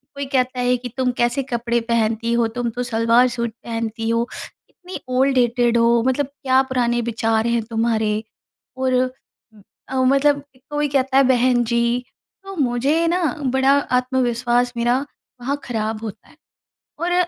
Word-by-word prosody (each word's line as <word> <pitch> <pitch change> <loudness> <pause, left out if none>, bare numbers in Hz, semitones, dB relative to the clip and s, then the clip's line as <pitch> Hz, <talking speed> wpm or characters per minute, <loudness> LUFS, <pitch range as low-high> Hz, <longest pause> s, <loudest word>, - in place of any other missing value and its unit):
कोई 280 0 -4
कहता 255 -2 0
है 250 0 +2
कि, 245 0 -7
"तुम 255 -1 +1
कैसे 240 +3 +1
कपड़े 235 -2 -1
पहनती 230 0 +1
हो 235 -1 +2
तुम 240 -1 -1
तो 245 +2 -4
सलवार-सूट 235 0 +2
पहनती 225 -1 -3
हो, 230 +1 +1 0.4
इतनी 365 0 -9 0.2
ओल्ड 270 +1 +3
डेटेड 240 -1 +2
हो, 235 0 +4
मतलब 260 +2 +1
क्या 265 -2 +1
पुराने 240 -2 +1
विचार 225 0 0
हैं 235 0 +1
तुम्हारे।" 220 -2 0 0.5
और 260 -1 +1 1.0
ओ, 260 0 +2
मतलब 280 +2 +3 0.3
कोई 295 0 0
कहता 270 -1 +1
है 275 - +7
बहन-जी 240 -1 +2 0.4
तो 390 0 -8
मुझे 280 +3 +1
ना 355 +2 +1 0.3
बड़ा 265 +1 +4 0.3
आत्मविश्वास 245 -1 0
मेरा 240 +2 +2 0.4
वहाँ 275 +4 -1
खराब 220 -2 -3
होता 215 -1 -8
है, - - -20 0.6
और 345 +2 0
245 Hz, 145 wpm, -21 LUFS, 235-265 Hz, 1.0 s, है